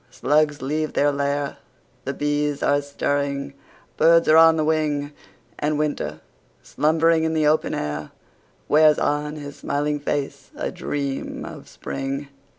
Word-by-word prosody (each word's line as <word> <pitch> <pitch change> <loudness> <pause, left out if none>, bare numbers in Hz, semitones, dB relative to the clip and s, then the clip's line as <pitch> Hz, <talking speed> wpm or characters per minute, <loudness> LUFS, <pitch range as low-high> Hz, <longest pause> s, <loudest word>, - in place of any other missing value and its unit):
Slugs 150 -2 +1
leave 155 +3 -2
their 145 0 +3
lair— 140 0 -2 0.5
The 140 - -2
bees 145 0 -1
are 145 0 +3
stirring—birds 140 +3 0
are 155 - +6
on 165 0 +7
the 155 -1 0
wing— 150 -2 0 0.5
And 150 0 0
Winter, 150 -1 -2 0.4
slumbering 160 +1 +2
in 160 0 0
the 155 -1 +2
open 155 +1 +2
air, 75 0 -4 0.6
Wears 155 0 +5
on 150 +1 -1
his 145 -1 -8
smiling 145 +1 -1
face 140 -1 -3
a - - -3
dream 140 -2 -4
of - - -10
Spring! 135 +1 -5
145 Hz, 135 wpm, -23 LUFS, 140-155 Hz, 0.6 s, on